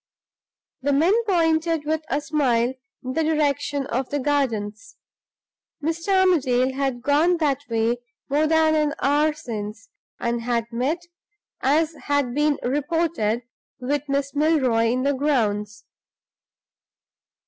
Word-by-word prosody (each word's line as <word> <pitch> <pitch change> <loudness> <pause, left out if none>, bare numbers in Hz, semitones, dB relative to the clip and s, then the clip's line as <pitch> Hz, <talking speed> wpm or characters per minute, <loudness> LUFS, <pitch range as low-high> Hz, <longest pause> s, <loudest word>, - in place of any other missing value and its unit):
The 285 +2 +1
men 325 +8 +4
pointed 325 -4 +1
with 315 +1 0
a 285 - 0
smile 260 -5 +1 0.3
in 255 0 -4
the 320 - +1
direction 290 -2 0
of 260 +1 -2
the 290 - -1
gardens; 230 -7 -2 0.8
Mr. 335 +5 +1
Armadale 265 -8 +2
had 265 -3 -2
gone 310 +6 +3
that 290 -5 +1
way 230 +1 +1 0.3
more 295 +3 +2
than 320 0 +3
an 300 -1 +1
hour 295 +2 +2
since, 220 - -7 0.3
and 235 0 -1
had 235 -1 -1
met 275 +9 -1 0.6
(as 310 +4 +2
had 285 -4 +1
been 295 +1 +2
reported) 285 -5 0 0.4
with 285 +3 -2
Miss 275 0 -1
Milroy 285 -7 +2
in 250 +3 +1
the 285 +1 +2
grounds. 215 -7 -1
285 Hz, 125 wpm, -23 LUFS, 245-310 Hz, 0.8 s, men